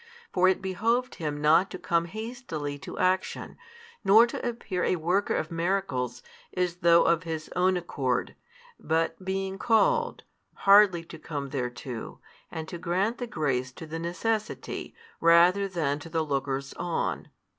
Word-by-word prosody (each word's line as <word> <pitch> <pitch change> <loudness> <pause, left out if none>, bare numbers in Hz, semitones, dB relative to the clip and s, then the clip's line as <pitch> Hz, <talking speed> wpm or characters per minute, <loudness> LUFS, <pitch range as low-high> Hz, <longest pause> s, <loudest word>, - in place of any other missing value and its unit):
For 185 0 +4
it 190 0 +2
behoved 230 +7 0
Him 150 -2 -2
not 160 +6 +4
to 185 - -6
come 170 -1 0
hastily 185 - -5
to - - -8
action, 185 +1 0 0.5
nor 220 +4 +7
to 235 - -6
appear 205 -6 -3
a - - +2
Worker 180 +5 0
of 155 - -2
miracles 165 -9 -1 0.3
as 180 -1 0
though 170 -1 +5
of 170 -1 +3
His 160 -2 -5
Own 185 +1 +3
accord, 135 -8 -2 0.5
but, 165 +2 -1
being 190 0 -3
called, 475 - +2 0.3
hardly 195 -4 +6
to - - -11
come 145 -3 -5
thereto, 125 -3 -5 0.3
and 160 -1 -6
to 175 - -7
grant 190 +7 0
the 245 - -3
grace 135 - -1
to 160 - -9
the 160 +1 -5
necessity 215 +6 -3 0.2
rather 175 +4 +5
than 155 -6 -1
to 155 - -10
the 160 -1 0
lookers 135 -1 -2
on. 175 -1 -2
170 Hz, 150 wpm, -27 LUFS, 155-195 Hz, 0.5 s, nor